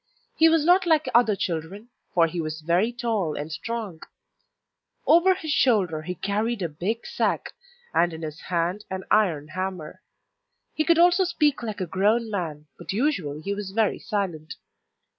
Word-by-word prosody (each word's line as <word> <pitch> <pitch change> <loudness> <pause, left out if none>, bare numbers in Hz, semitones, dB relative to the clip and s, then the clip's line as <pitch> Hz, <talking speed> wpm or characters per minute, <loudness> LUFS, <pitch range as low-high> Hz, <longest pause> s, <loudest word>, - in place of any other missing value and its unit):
He 325 0 +6
was 320 -2 +2
not 360 +1 +4
like 315 -2 +3
other 235 -3 +4
children, 185 +5 -4 0.3
for 170 -2 +5
he 170 +1 -3
was 155 0 -5
very 175 +8 +1
tall 225 - -2
and 150 +2 -5
strong; 200 +1 -5 1.0
over 365 +3 +5
his 320 -5 -5
shoulder 195 - +2
he 180 +3 -5
carried 210 +3 -1
a 170 - -1
big 190 +10 -3
sack, - - -1 0.4
and 175 - +3
in 160 0 -8
his 155 +1 -6
hand 175 +3 -1
an 190 0 -4
iron 165 -9 +2
hammer. 185 -3 -5 0.7
He 310 - 0
could 335 -1 +4
also 355 +2 +5
speak 305 -6 +1
like 215 -4 -5
a - - 0
grown 215 +6 +1
man, 160 -7 -4
but - - -5
usually 195 - -1
he 200 +4 -2
was 200 -1 -5
very 220 -1 +1
silent. 185 -8 -3
200 Hz, 165 wpm, -25 LUFS, 165-240 Hz, 1.0 s, He